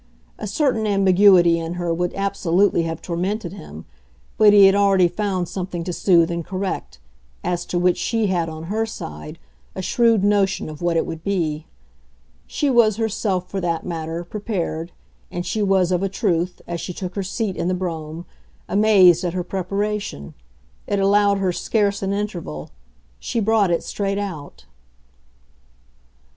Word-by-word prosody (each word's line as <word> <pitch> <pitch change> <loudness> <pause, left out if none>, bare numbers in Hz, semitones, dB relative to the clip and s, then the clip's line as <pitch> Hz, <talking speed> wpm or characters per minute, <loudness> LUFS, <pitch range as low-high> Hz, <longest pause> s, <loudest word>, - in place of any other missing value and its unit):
A - - -4
certain 225 -1 0
ambiguity 190 -3 +5
in 165 +1 -4
her 175 -1 -1
would 175 +1 -1
absolutely 195 -2 +1
have 165 -1 -4
tormented 180 +2 -3
him; 75 +1 -10 0.5
but 215 -1 +6
he 205 -1 +8
had 195 - +6
already 195 -3 +4
found 185 -1 -2
something 180 -2 -4
to 180 - -4
soothe 170 -2 +3
and 170 0 -3
correct 185 - -4 0.5
as 175 -1 -2
to 175 - -2
which 180 0 +2
she 225 -2 0
had, 175 -4 0
on 160 0 -8
her 210 +6 -1
side, 115 - -8 0.4
a 190 - -4
shrewd 230 -1 +3
notion 200 -4 +1
of 155 +1 -9
what 175 -1 +1
it - - +1
would 160 0 -7
be. 165 -6 -2 0.8
She 295 - -1
was 235 -5 +4
herself, 200 -5 -1
for 195 +1 -4
that 170 -2 -2
matter, 165 -1 -4
prepared, 175 -4 -4 0.4
and 175 0 -5
she 220 - -2
was, 190 -3 +2
of 180 -1 +1
a 195 - 0
truth, 180 -4 -1
as 170 -1 -4
she 180 - -5
took 180 0 -6
her 200 - -2
seat 195 +1 -3
in 170 - -2
the 185 - +1
brougham, 165 -2 -5 0.4
amazed 195 -5 +5
at 175 -2 -1
her 180 -1 -2
preparation. 195 - -3 0.5
It 205 - 0
allowed 200 +1 +3
her 190 -2 0
scarce 200 +2 0
an 195 0 -1
interval; 180 - -4 0.5
she 235 - -2
brought 220 -2 +2
it 170 - 0
straight 200 -1 -2
out. 155 - -6
185 Hz, 165 wpm, -21 LUFS, 170-200 Hz, 0.8 s, he